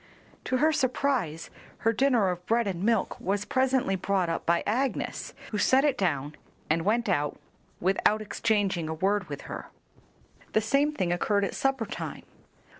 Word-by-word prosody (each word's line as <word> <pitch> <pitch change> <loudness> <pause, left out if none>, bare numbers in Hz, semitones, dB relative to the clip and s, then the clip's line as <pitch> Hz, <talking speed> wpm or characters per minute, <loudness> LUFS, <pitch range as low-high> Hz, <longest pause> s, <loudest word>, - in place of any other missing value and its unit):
To 255 - +1
her 315 +4 +3
surprise 255 - 0 0.3
her 225 - +4
dinner 240 -5 +3
of 175 0 -6
bread 235 +1 +2
and 185 -3 -3
milk 225 -2 +1
was 200 +2 -1
presently 260 -6 +1
brought 190 -1 0
up 165 - -3
by 170 0 +3
Agnes, 255 +5 -2 0.2
who 210 - -1
set 265 +5 +4
it 285 -3 +3
down 150 - -1 0.4
and 165 +1 +2
went 225 +5 +1
out 145 0 0 0.4
without 195 +3 +2
exchanging 205 -6 0
a 160 - -2
word 195 +2 0
with 145 -1 -5
her. - - -7 0.9
The 215 - +4
same 275 +7 +2
thing 185 -12 0
occurred 200 +3 +1
at - - -4
supper 270 -4 0
time. - - -6
205 Hz, 165 wpm, -28 LUFS, 180-255 Hz, 0.9 s, her